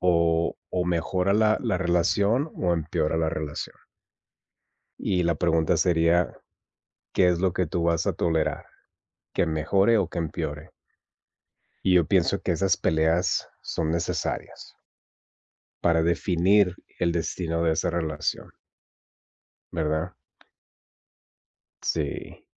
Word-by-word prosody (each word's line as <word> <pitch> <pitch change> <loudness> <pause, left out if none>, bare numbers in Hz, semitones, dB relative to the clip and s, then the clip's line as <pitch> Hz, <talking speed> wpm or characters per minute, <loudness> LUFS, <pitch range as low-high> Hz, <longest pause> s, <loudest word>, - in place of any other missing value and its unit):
o 85 -2 +2
o 90 -1 0
mejora 90 +2 0
la 110 0 +3
la - - 0
relación 100 - +1
o 90 -1 +1
empeora 80 -1 -1
la 80 -1 +1
relación. 75 -2 -5 1.2
Y 90 -2 0
la 85 -1 +1
pregunta 80 -1 +2
sería, 85 0 +2 0.8
¿qué 90 - +4
es 90 -1 +2
lo 95 -1 +2
que 90 - 0
tú 85 +2 -2
vas 85 -1 +1
a - - +2
tolerar? 80 -2 -1 0.7
¿Que - - +1
mejore 95 +8 +2
o 95 -4 0
que 90 - -5
empeore? 75 -1 -4 1.1
Y 95 - +4
yo 85 -3 +4
pienso - - +2
que - - -1
esas 95 0 +2
peleas 80 +2 +1
son 80 -1 -2
necesarias 85 0 -3 1.1
para 80 -1 +3
definir 90 +2 +2 0.2
el 85 - +2
destino 85 0 -2
de 80 - +3
esa 80 - 0
relación. 80 -3 -3 1.2
¿Verdad? 80 +1 -1 1.7
Sí. 75 -4 -3
85 Hz, 115 wpm, -25 LUFS, 80-90 Hz, 1.7 s, qué